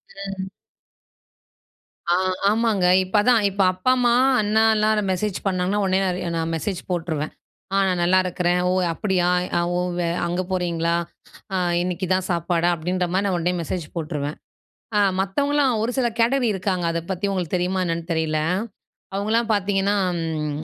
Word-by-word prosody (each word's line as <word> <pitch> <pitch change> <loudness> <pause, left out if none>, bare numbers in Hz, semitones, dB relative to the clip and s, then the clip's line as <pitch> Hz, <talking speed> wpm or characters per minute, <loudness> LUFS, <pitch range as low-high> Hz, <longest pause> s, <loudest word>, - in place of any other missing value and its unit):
ம். 195 -1 -5 1.6
ஆ. - - +4 0.3
ஆமாங்க. 215 -3 +1 0.2
இப்போ 185 +3 -1
அதான். 230 0 +4
இப்போ 195 0 0
அப்பா, 185 +8 +1
அம்மா, 240 -1 +3 0.3
அண்ணா 215 +1 +2
எல்லாரும் 215 -2 +1
மெசேஜ் 185 +1 -1
பண்ணாங்கன்னா, 185 +2 0
உடனே 190 0 +2
நான் 185 - 0
ரி - - -5 0.2
நான் 165 0 -1
மெசேஜ் 180 +3 -3
போட்ருவேன். 160 -3 -2 0.4
"ஆ. - - +2
நான் 180 -2 0
நல்லா 185 +2 +4
இருக்கிறேன். 180 0 0
ஓ! - - +2 0.2
அப்படியா? 180 -1 0 0.5
ஓ! - - +1 0.2
வே 175 - 0 0.2
அங்க 175 +1 -1
போறீங்களா? 170 -2 0 0.6
அ - - +1 0.2
இன்னிக்கு, 180 +1 -2
இதான் 185 0 0
சாப்பாடா?" 170 0 +1
அப்படின்ற 180 +2 -1
மாரி 195 +2 +1
நான் 185 -2 0
உடனே 175 +1 0
மெசேஜ் 165 +1 -4
போட்டுருவேன். 150 -3 -3 0.6
அ - - +4 0.2
மத்தவங்கல்லாம் 280 +7 +1
ஒரு 235 - 0
சில 255 -2 +2
கேட்டகரி 245 +2 +3
இருக்காங்க. 185 -2 -1
அதை 170 0 -2
பத்தி 185 +1 -2
உங்களுக்கு 185 -3 -2
தெரியுமா 185 +1 -1
என்னான்னு 165 0 -3
தெரியல. 160 -1 0 0.8
அவுங்கள்லாம் 220 +3 0
பாத்தீங்கன்னா, 200 0 +1 0.3
ம் 155 -2 -3
185 Hz, 155 wpm, -22 LUFS, 170-205 Hz, 1.6 s, ஆ